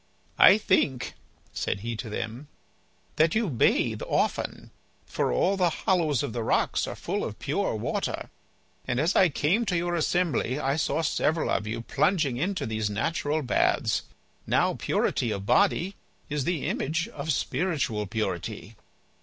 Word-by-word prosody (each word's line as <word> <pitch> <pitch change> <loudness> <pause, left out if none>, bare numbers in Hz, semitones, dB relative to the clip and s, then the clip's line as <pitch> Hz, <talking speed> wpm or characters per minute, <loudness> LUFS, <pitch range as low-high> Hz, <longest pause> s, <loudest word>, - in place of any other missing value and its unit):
"I 200 - +9
think," 150 - +1 0.4
said 100 - -2
he 115 +1 -3
to 110 0 -5
them, 115 +6 -5 0.7
"that 160 +3 +3
you 220 -6 +1
bathe 120 - +2
often, - - -1 0.3
for - - -1
all 190 - +2
the 180 -2 +3
hollows 165 - +1
of 135 -6 -4
the 120 - -2
rocks 110 - +1
are - - -5
full - - -3
of - - -5
pure - - -1
water, - - -3 0.6
and 125 0 0
as 165 +7 +1
I 185 - +6
came 170 +10 +1
to 180 -4 0
your 175 +1 -1
assembly 165 -5 0
I 135 0 0
saw 160 +1 0
several 160 +1 +1
of 105 - 0
you 110 +1 -3
plunging 145 0 +1
into 185 +7 -1
these 110 -1 -1
natural 150 +7 -1
baths. 125 - +1 0.5
Now - - +2
purity 120 - 0
of 100 -2 -3
body 195 - +2 0.4
is 145 -3 -1
the 175 -5 -1
image 160 +4 -1
of 150 +2 -3
spiritual 135 - -1
purity." 100 -5 -4
150 Hz, 155 wpm, -27 LUFS, 115-175 Hz, 0.7 s, I